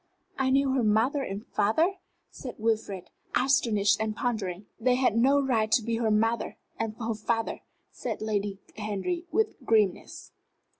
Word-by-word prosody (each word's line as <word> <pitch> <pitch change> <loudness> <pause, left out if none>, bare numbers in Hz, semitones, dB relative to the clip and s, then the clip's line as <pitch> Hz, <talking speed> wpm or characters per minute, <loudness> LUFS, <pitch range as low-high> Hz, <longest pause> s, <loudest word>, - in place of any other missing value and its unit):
"I 270 -1 +1
knew 270 0 +3
her 260 -1 +2
mother 225 +7 +2
and 200 -5 -4
her - - -24
father?" 315 - +2 0.3
said 250 - -8
Sir 215 - -12
Wilfrid, 215 -5 -1 0.2
astonished 230 -6 +3
and 215 -1 -1
pondering. 210 -6 -2
"They 250 +2 +3
had 250 -4 +2
no 270 +5 +4
right 230 -6 +1
to 240 - +4
be 230 0 -1
her 230 -1 +1
mother 225 +2 +1 0.2
and 225 -1 -2
her 230 -1 -2
father," 225 +1 -2 0.3
said - - -4
Lady 205 -2 -1 0.2
Henry, 215 - -2
with 435 -10 0
grimness. 215 -6 0
225 Hz, 160 wpm, -28 LUFS, 210-260 Hz, 0.3 s, no